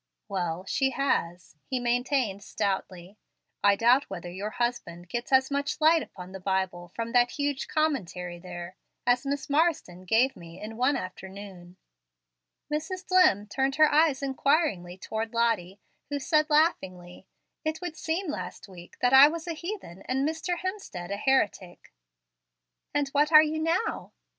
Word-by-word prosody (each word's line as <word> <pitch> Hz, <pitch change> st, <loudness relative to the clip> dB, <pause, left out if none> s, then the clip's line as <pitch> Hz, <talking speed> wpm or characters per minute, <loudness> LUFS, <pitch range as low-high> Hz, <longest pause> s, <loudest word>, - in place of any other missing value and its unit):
"Well, 180 Hz, -3 st, -3 dB
she 265 Hz, +6 st, +1 dB
has," 175 Hz, -, -2 dB
he 260 Hz, -, -1 dB
maintained 245 Hz, -3 st, 0 dB
stoutly. 190 Hz, 0 st, -3 dB, 0.4 s
"I 200 Hz, 0 st, +6 dB
doubt 245 Hz, +6 st, +3 dB
whether 175 Hz, -2 st, -6 dB
your 195 Hz, +4 st, -4 dB
husband 215 Hz, -8 st, -3 dB
gets 240 Hz, +5 st, -4 dB
as 265 Hz, +1 st, +4 dB
much 280 Hz, +1 st, -1 dB
light 320 Hz, +1 st, +5 dB
upon 180 Hz, -7 st, -10 dB
the 190 Hz, -, -8 dB
Bible 185 Hz, -2 st, -2 dB
from 230 Hz, 0 st, -3 dB
that 245 Hz, 0 st, +4 dB
huge 285 Hz, -2 st, -2 dB
commentary 180 Hz, -, -2 dB
there 175 Hz, 0 st, -8 dB, 0.3 s
as 245 Hz, +2 st, +2 dB
Miss 280 Hz, 0 st, -2 dB
Marsden 290 Hz, -, 0 dB
gave 235 Hz, +8 st, +3 dB
me 170 Hz, -1 st, -12 dB
in 215 Hz, +1 st, -7 dB
one 255 Hz, +5 st, +2 dB
afternoon." 185 Hz, -1 st, -9 dB, 1.0 s
Mrs. 365 Hz, +5 st, -3 dB
Dlimm 365 Hz, -, +4 dB
turned 270 Hz, +5 st, 0 dB
her 310 Hz, -1 st, +5 dB
eyes 295 Hz, -3 st, +3 dB
inquiringly 270 Hz, -, 0 dB
toward 220 Hz, +4 st, -4 dB
Lottie, 210 Hz, -5 st, 0 dB, 0.3 s
who 290 Hz, -, -1 dB
said, 305 Hz, +2 st, +1 dB
laughingly, 190 Hz, -, 0 dB, 0.4 s
"It 315 Hz, 0 st, -2 dB
would 355 Hz, -3 st, -5 dB
seem, 330 Hz, +5 st, -2 dB
last -, -, -7 dB
week, 175 Hz, -2 st, -13 dB
that 250 Hz, +1 st, +3 dB
I 270 Hz, +2 st, +10 dB
was 330 Hz, +2 st, -4 dB
a 340 Hz, -, -2 dB
heathen 335 Hz, -, -7 dB
and 265 Hz, +2 st, 0 dB
Mr. 320 Hz, +3 st, -2 dB
Hemstead 365 Hz, -, -5 dB
a -, -, 0 dB
heretic." 205 Hz, -, -1 dB, 1.0 s
"And 290 Hz, -1 st, 0 dB
what 295 Hz, +2 st, +2 dB
are 305 Hz, -1 st, +9 dB
you 315 Hz, 0 st, -2 dB
now?" 330 Hz, +7 st, -1 dB
245 Hz, 155 wpm, -27 LUFS, 185-300 Hz, 1.0 s, I